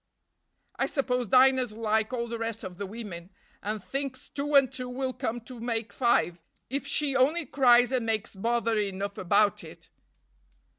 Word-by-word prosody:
"I - - +1
suppose 250 -4 -1
Dinah's 255 0 +4
like 220 0 0
all 235 -2 -2
the 230 0 -5
rest 225 -1 -4
of 185 -1 -8
the 200 - -3
women, 190 -5 -8 0.3
and 210 0 -4
thinks 275 -1 -5
two 290 +1 -2
and 270 -1 +5
two 255 -1 -4
will 255 +1 -3
come 240 0 -3
to 240 +1 -11
make 230 -1 -3
five, 210 -9 +1 0.3
if 275 +1 -2
she 285 -1 +1
only 295 +6 +3
cries 245 -2 +5
and 255 -2 +1
makes 220 0 -2
bother 230 +2 0
enough 200 0 -3
about 200 +2 +2
it." - - -13
235 Hz, 165 wpm, -28 LUFS, 215-260 Hz, 0.3 s, and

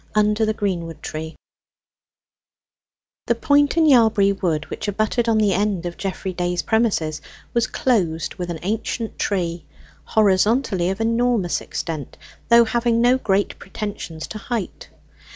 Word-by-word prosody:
UNDER 210 +1 +2
THE 215 - +1
GREENWOOD 170 -6 -3
TREE 160 +1 -6 1.9
The - - +2
point 290 +1 +2
in 325 - +5
Yalbury 220 -8 +5
Wood 165 -5 -1
which - - -4
abutted 215 +3 0
on 225 - +3
the 210 -3 +3
end 195 -2 0
of 175 0 -4
Geoffrey 190 -1 -4
Day's 175 0 -1
premises 205 -9 0 0.3
was 235 -2 +2
closed 175 -11 0
with 180 -2 -5
an 170 - -3
ancient 220 +3 -3
tree, 175 -4 -2 0.4
horizontally 205 -2 +2
of 195 +3 -3
enormous 230 -5 +1
extent, 155 -6 -5 0.3
though 235 0 +7
having 235 0 +1
no 245 +2 +4
great 200 -3 0
pretensions 195 -6 -6
to 215 - -6
height. 230 -3 -5
205 Hz, 135 wpm, -21 LUFS, 175-230 Hz, 1.9 s, though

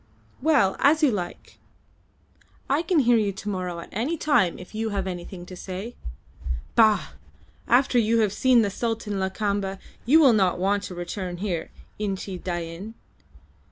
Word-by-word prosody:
"Well, 265 -10 +3
as 310 +3 +4
you 285 - +5
like. 180 -5 -6 1.1
I 280 +4 +2
can 340 -3 +2
hear 240 -2 +4
you 210 -2 +1
to 200 +2 -6
morrow 180 -3 -3
at - - -11
any 260 - -1
time 285 - +2
if 180 - -12
you 220 +1 -2
have 200 -2 -2
anything 175 0 -6
to 185 - -10
say. 190 +6 -6 0.8
Bah! 220 -2 +4 0.6
After 250 0 +4
you 230 0 +2
have 210 -2 +1
seen 250 0 +4
the 200 - -1
Sultan 220 -2 -2
Lakamba 195 0 -1 0.3
you 305 +6 +7
will 275 -6 +7
not 190 -4 +2
want 200 +2 +1
to 180 - -7
return 175 +1 -5
here, 175 -4 -3 0.3
Inchi 195 -2 -3
Dain. 175 +4 -5
205 Hz, 160 wpm, -25 LUFS, 185-235 Hz, 1.1 s, you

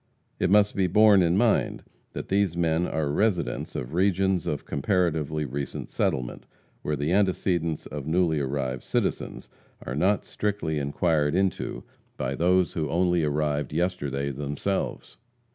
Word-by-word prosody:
It - - +1
must 105 +1 +4
be 95 -2 +2
borne 105 +1 +6
in 85 +1 +2
mind 115 -1 +2 0.3
that - - -6
these 95 -3 +1
men 85 0 +1
are 75 -3 -1
residents 95 0 0
of 60 +4 -4
regions 95 0 +1
of 75 - -2
comparatively 80 -2 0
recent 70 +1 -5
settlement, 65 -2 -2 0.3
where 75 - -1
the 75 +3 -1
antecedents 90 -4 +1
of 75 -1 -6
newly 80 -2 +2
arrived 65 -2 -2
citizens - - -2 0.4
are - - -4
not 95 +7 +2
strictly 100 -7 -2
inquired 75 +1 +1
into 95 -1 -1 0.3
by 65 +1 -2
those 90 +4 +2
who 75 -3 -2
only 90 +1 +2
arrived 75 -1 -1
yesterday 70 -5 -1
themselves. 75 +8 -3
80 Hz, 140 wpm, -26 LUFS, 75-95 Hz, 0.4 s, borne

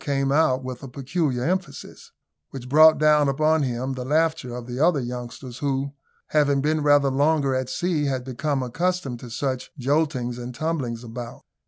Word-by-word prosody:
came 135 -1 0
out 140 -3 +2
with 130 -1 -6
a 135 - -7
peculiar 135 0 -2
emphasis 185 +5 -4 0.4
which 130 -2 -8
brought 155 +4 +7
down 150 -2 +4
upon 155 +3 +2
him 130 0 -2
the 130 -1 -5
laughter 155 -2 0
of 125 -1 -6
the 125 +1 -6
other 160 -1 +3
youngsters, 125 0 -6
who, 140 0 -1 0.4
having 145 -2 +2
been 155 +2 +1
rather 145 -2 +4
longer 140 0 +2
at 130 -1 -2
sea, 165 +1 -1
had 130 -2 -1
become 135 +2 -2
accustomed 165 -1 -2
to 120 - -10
such 130 +1 -3
joltings 130 -3 0
and 120 0 -7
tumblings 135 -6 -3
about. 120 0 -8
135 Hz, 170 wpm, -24 LUFS, 125-155 Hz, 0.4 s, brought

